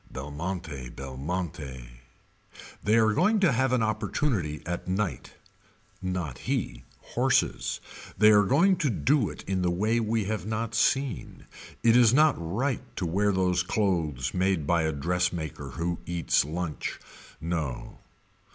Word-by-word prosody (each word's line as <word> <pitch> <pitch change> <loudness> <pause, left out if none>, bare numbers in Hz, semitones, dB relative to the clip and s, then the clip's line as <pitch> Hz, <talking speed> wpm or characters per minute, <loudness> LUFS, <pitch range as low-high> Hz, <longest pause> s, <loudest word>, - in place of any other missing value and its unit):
Belmonte 75 -1 -5
Belmonte. 70 -2 -5 0.9
They 105 +2 +2
are 110 -1 +4
going 205 - +3
to 180 -6 +5
have 130 +1 +1
an 125 -3 +2
opportunity 110 - -1
at 90 0 -4
night. 95 +1 -2 0.7
Not 90 -8 -3
he. - - -3 0.3
Horses. - - +1 0.4
They 105 +2 +7
are 105 -1 +7
going 175 - +4
to 150 - +1
do 125 +1 +2
it - - -9
in 95 -1 -1
the 90 - +2
way 105 +7 +1
we 110 -1 0
have 105 -1 -3
not 110 +1 -2
seen. 135 +3 0 0.4
It 115 0 +5
is 120 -1 +6
not 155 0 +6
right 110 +11 -1
to 90 - -2
wear 100 +5 +2
those 90 -2 +2
clothes 85 - 0
made 90 -4 +1
by 85 +2 +2
a 80 - +1
dressmaker 85 0 -2
who 85 +1 -1
eats 85 -6 +2
lunch. 80 +1 -4 0.4
No. 80 -6 -4
90 Hz, 140 wpm, -27 LUFS, 80-110 Hz, 0.9 s, They